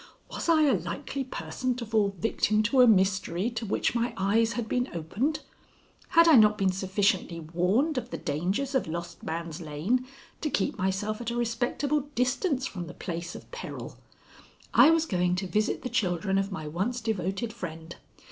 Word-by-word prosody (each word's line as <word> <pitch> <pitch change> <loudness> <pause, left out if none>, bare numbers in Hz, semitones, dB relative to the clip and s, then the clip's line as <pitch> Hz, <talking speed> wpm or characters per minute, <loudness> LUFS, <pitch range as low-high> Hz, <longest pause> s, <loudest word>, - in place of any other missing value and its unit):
Was - - -4
I 315 -2 +5
a 290 - +4
likely 275 - -4
person 255 0 -3
to 240 -1 -5
fall 210 -3 +1
victim 215 +1 +1
to 255 +5 +4
a 250 - +8
mystery 190 0 +2
to 225 -1 -4
which - - 0
my 235 0 -1
eyes 220 +4 +2
had 235 -2 -3
been 250 +3 0
opened? 205 - -1 0.7
Had 335 -2 +5
I 315 -5 +8
not 210 -1 +6
been 190 -1 +2
sufficiently 190 -2 0
warned 185 - +1
of 240 0 -9
the - - -4
dangers 185 - -2
of 265 - +1
Lost 170 +1 -6
Man's 165 +1 -5
Lane 175 +12 -1 0.3
to 305 - 0
keep 205 - 0
myself 205 +3 -1
at 235 - -3
a 235 - -3
respectable 255 +5 -1
distance 255 +3 +1
from 180 -8 -5
the 175 - -9
place 170 -1 -5
of - - -11
peril? - - -7 0.8
I - - +8
was 325 0 +3
going 180 - +1
to 185 +2 -2
visit 210 +3 0
the - - -2
children 195 -4 0
of 195 +1 -2
my 155 -5 -5
once 195 +11 -2
devoted 215 0 -2
friend. 165 -6 -7
210 Hz, 180 wpm, -28 LUFS, 180-250 Hz, 0.8 s, a